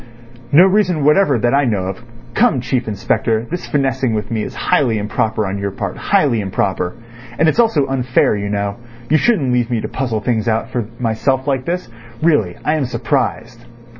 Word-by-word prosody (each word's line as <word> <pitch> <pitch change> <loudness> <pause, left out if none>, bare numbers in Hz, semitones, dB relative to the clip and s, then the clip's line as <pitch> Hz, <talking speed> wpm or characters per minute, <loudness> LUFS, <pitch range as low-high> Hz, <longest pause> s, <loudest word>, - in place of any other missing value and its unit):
"No 165 +6 +7
reason 185 -6 +2
whatever 150 -1 +4
that 120 +3 +1
I 140 0 +3
know 105 -6 0
of. 95 +5 -5 0.3
Come, 130 - +3
Chief 125 0 -2
Inspector, 110 +1 -1
this 175 - -4
finessing 135 -4 0
with 105 +1 -4
me 110 -2 -1
is 125 +3 -6
highly 120 -1 +1
improper 110 +1 -1
on 100 +1 -3
your 100 0 -2
part—highly 115 - 0
improper. 95 -1 -2 0.4
And 160 - +3
it's 160 - +1
also 225 -12 +3
unfair, 130 -4 +1
you 100 0 -3
know. 100 -1 -2 0.3
You 155 - +6
shouldn't 150 - +2
leave 120 -1 +1
me 120 -2 0
to - - -4
puzzle 120 -5 -2
things 115 -1 -1
out 115 +1 0
for 120 -4 -2
myself 125 +3 0
like 135 -2 0
this. 180 -2 -2 0.4
Really, 130 - +2
I 150 +1 +2
am 145 - 0
surprised." 120 -1 -2
120 Hz, 185 wpm, -17 LUFS, 110-140 Hz, 0.4 s, No